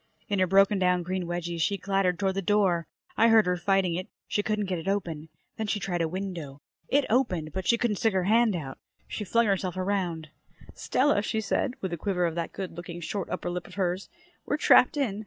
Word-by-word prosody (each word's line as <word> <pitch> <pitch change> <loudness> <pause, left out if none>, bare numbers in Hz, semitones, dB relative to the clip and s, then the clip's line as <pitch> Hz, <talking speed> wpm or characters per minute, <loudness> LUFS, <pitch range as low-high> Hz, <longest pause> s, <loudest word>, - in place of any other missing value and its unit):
In 200 -2 0
her 185 - +3
broken 195 +2 +4
down 180 -1 +2
green 185 +1 -2
wedgies 175 -1 -3
she 200 +5 +1
clattered 195 -2 0
toward 190 0 0
the 195 - -2
door. 185 -4 +2 0.3
I 225 - +5
heard 225 -3 +6
her 180 0 +1
fighting 190 0 +1
it. 180 +2 -3 0.2
She 205 - 0
couldn't 210 0 -1
get 185 -2 -2
it 165 - -8
open. 165 -6 -2 0.3
Then 220 - -2
she 210 0 0
tried 175 -3 -2
a 165 - +1
window. 170 -6 -5 0.3
It 280 0 +2
opened, 185 -11 0
but 190 -1 -4
she 235 - +4
couldn't 230 -4 0
stick 225 +1 +1
her 190 -1 +1
hand 220 +1 +3
out. 135 -6 -6 0.3
She 210 - -4
flung 230 +4 +2
herself 190 -3 -1
around. 185 -5 -2 0.4
"Stella," 275 -5 +1
she 220 +1 -2
said, 245 +4 -1
with 190 -2 -3
a - - -2
quiver 180 0 0
of 165 - -1
that 170 0 -3
good 190 -2 -5
looking 175 0 -8
short 185 +2 -4
upper 175 - -3
lip 175 -2 -5
of - - -13
hers, 185 -1 -1 0.3
"we're 295 - -1
trapped 290 -1 +5
in. 225 -8 -1
190 Hz, 225 wpm, -27 LUFS, 175-205 Hz, 0.4 s, heard